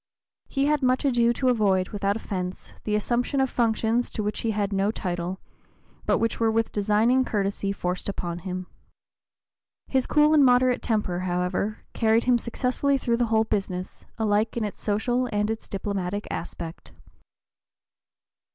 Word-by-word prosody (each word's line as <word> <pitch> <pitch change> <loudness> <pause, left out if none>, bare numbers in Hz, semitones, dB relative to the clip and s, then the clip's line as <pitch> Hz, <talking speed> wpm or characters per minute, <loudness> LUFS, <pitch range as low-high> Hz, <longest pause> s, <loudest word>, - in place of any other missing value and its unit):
He 275 -1 0
had 300 0 +2
much 255 +1 +2
ado 240 -3 +3
to 255 +2 +1
avoid, 195 -6 +2
without 200 -1 -1
offence, 185 -4 -5
the 210 - +1
assumption 240 +5 0
of 265 -1 +1
functions 230 0 +1
to 215 - -4
which 210 0 -2
he 230 - -1
had 205 -2 -1
no 195 +1 +2
title, 180 -3 -3 0.7
but - - +4
which 230 - -1
were 225 -1 +3
with 225 0 +1
designing 215 +5 +3
courtesy 200 -3 -1
forced 180 -1 -3
upon 175 -3 -4
him. 185 0 -5 1.2
His 260 -2 0
cool 300 0 +4
and 300 -2 +6
moderate 250 -1 +4
temper, 210 -6 -1
however, 180 +3 -1
carried 225 0 +3
him 245 -1 +3
successfully 255 +4 0
through 235 -3 0
the 240 -1 +1
whole 220 0 +3
business, 190 -4 -3
alike 215 +1 +1
in 230 - 0
its 210 - -5
social 240 +4 0
and 210 +1 0
its 225 - -6
diplomatic 200 0 -3
aspect. 170 0 -6
215 Hz, 155 wpm, -25 LUFS, 195-245 Hz, 1.2 s, and